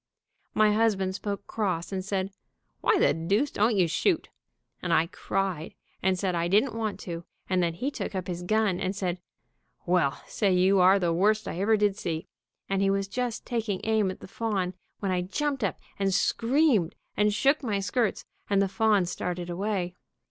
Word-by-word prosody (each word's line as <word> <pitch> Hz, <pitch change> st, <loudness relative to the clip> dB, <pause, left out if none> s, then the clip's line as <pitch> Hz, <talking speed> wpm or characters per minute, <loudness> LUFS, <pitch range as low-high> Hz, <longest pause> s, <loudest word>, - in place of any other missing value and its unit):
My 215 Hz, -1 st, +5 dB
husband 205 Hz, -4 st, +2 dB
spoke 200 Hz, +1 st, -4 dB
cross, 185 Hz, -6 st, -2 dB
and 190 Hz, -1 st, -2 dB
said, 195 Hz, 0 st, -2 dB, 0.5 s
'Why -, -, +3 dB
the -, -, +4 dB
deuce 200 Hz, -, 0 dB
don't 215 Hz, +2 st, +2 dB
you 185 Hz, -3 st, +3 dB
shoot?' 320 Hz, -, +1 dB, 0.5 s
and 175 Hz, -, -2 dB
I 165 Hz, 0 st, +4 dB
cried 180 Hz, -1 st, -3 dB, 0.3 s
and 190 Hz, 0 st, +2 dB
said 185 Hz, -1 st, 0 dB
I 170 Hz, 0 st, 0 dB
didn't 215 Hz, +8 st, +3 dB
want 220 Hz, -2 st, -3 dB
to, 170 Hz, -1 st, -5 dB, 0.2 s
and 185 Hz, -1 st, +2 dB
then 170 Hz, -1 st, 0 dB
he 265 Hz, +11 st, -2 dB
took 210 Hz, -, -5 dB
up 185 Hz, -1 st, -2 dB
his 175 Hz, -1 st, -4 dB
gun 205 Hz, 0 st, +1 dB
and 190 Hz, +1 st, -2 dB
said, 185 Hz, -2 st, -2 dB, 0.7 s
'Well, 170 Hz, -6 st, +2 dB
say, 200 Hz, -3 st, 0 dB
you 185 Hz, +2 st, +4 dB
are 185 Hz, +2 st, +6 dB
the 175 Hz, -3 st, +1 dB
worst 210 Hz, +5 st, +2 dB
I 170 Hz, -, -4 dB
ever 215 Hz, +3 st, +3 dB
did 205 Hz, -1 st, +2 dB
see,' 160 Hz, -2 st, -3 dB, 0.4 s
and 195 Hz, 0 st, 0 dB
he 195 Hz, -, +3 dB
was 195 Hz, 0 st, 0 dB
just 245 Hz, +2 st, -3 dB
taking 225 Hz, -5 st, -2 dB
aim 220 Hz, -3 st, +2 dB
at 185 Hz, -, -7 dB
the -, -, -9 dB
fawn 195 Hz, -4 st, -2 dB, 0.3 s
when 195 Hz, -2 st, 0 dB
I 180 Hz, -1 st, +1 dB
jumped 275 Hz, +8 st, -2 dB
up 200 Hz, -, 0 dB, 0.2 s
and 195 Hz, -1 st, +2 dB
screamed, 230 Hz, -, +2 dB, 0.2 s
and 210 Hz, 0 st, +3 dB
shook 275 Hz, +8 st, +2 dB
my 215 Hz, -7 st, -1 dB
skirts, 220 Hz, +2 st, 0 dB, 0.2 s
and 200 Hz, -1 st, +3 dB
the 195 Hz, -, +3 dB
fawn 210 Hz, -2 st, +2 dB
started 175 Hz, 0 st, -3 dB
away. 185 Hz, -1 st, -2 dB
195 Hz, 190 wpm, -27 LUFS, 180-215 Hz, 0.7 s, are